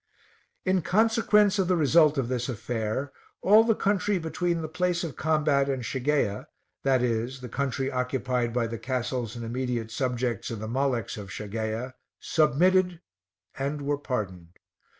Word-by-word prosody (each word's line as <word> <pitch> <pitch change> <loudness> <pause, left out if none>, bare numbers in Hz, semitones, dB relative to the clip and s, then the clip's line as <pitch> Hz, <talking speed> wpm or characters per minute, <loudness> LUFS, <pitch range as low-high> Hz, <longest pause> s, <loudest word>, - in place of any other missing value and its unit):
In 185 -1 +2
consequence 210 +1 +3
of 190 - +2
the 180 - +3
result 155 0 +4
of 130 -3 0
this 125 0 -2
affair, 120 +3 -3 0.3
all 215 +3 +7
the 225 -1 +2
country 200 0 +1
between 170 0 -1
the - - -3
place 175 +2 0
of 160 -6 -5
combat 150 -3 +2
and 130 -2 -2
Shageia, 130 -4 -1 0.4
i.e. 125 -4 +2
the 125 - -7
country 135 0 -1
occupied 125 -1 -1
by 120 0 0
the 115 0 -5
castles 125 -2 -2
and 120 -1 -5
immediate 120 -1 -3
subjects 125 -2 -2
of 115 - -5
the 110 - -5
Maleks 125 -2 -1
of 100 -1 -8
Shageia, 110 +5 -4 0.3
submitted 175 +3 +3 0.6
and 140 +2 -2
were 145 0 -1
pardoned. 95 -11 -4
135 Hz, 150 wpm, -27 LUFS, 120-160 Hz, 0.6 s, all